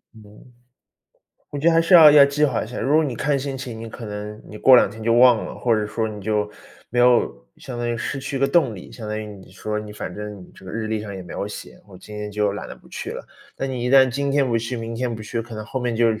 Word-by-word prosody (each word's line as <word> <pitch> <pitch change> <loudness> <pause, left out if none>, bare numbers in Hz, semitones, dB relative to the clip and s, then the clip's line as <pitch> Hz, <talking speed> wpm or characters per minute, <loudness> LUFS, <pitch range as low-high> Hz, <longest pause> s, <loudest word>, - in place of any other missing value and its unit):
嗯， 110 - -14 1.3
我 145 - -5
觉 155 +4 +3
得 - - +4
还 165 - +5
是 165 +3 +3
要 160 -3 +10
要 145 -1 +8
计 140 +2 +1
划 145 - 0
一 - - -10
下， 125 - -7
如 140 - +1
果 160 +1 +4
你 135 -5 -3
看 140 +4 0
心 135 0 -4
情， 125 -4 -7
你 115 - -7
可 115 +1 -9
能 105 0 -7
你 105 - -10
过 130 - +7
两 125 - +5
天 110 - -11
就 115 +1 +2
忘 120 -1 +5
了， - - -7
或 120 - 0
者 105 -1 0
说 110 +1 -2
你 105 -1 -8
就 105 0 -1 0.4
没 120 - -2
有， 120 - +3
相 125 -2 -8
当 120 0 -2
于 120 - -1
失 135 +4 -4
去 135 +1 -5
一 - - -1
个 135 - +3
动 140 -6 +2
力， 90 - -11
相 110 -3 -8
当 105 - -3
于 110 - -5
你 100 -3 -12
说 105 +3 -4
你 105 0 -7
反 105 -3 -6
正 105 -2 -8
这 - - -17
个 95 - -8
日 110 0 -3
历 110 -1 -1
上 105 -1 -7
也 95 - -7
没 90 - -10
有 - - -3
写， 105 - -9
我 95 -2 -14
今 105 +3 -11
天 105 0 -5
就 105 -1 0
懒 100 - -6
得 - - -8
不 - - -20
去 - - -6
了。 - - -7 0.3
那 - - -3
你 130 -2 -4
一 - - 0
旦 130 -1 +6
今 140 +3 -2
天 140 0 +3
不 115 -2 +1
去， 115 +3 -4
明 115 0 -5
天 120 0 -2
不 110 - -8
去， 115 +2 -3
可 115 0 -9
能 110 0 -6
后 130 - -4
面 120 -2 -2
就 115 +1 +3
115 Hz, 320 characters per minute, -22 LUFS, 105-130 Hz, 1.3 s, 要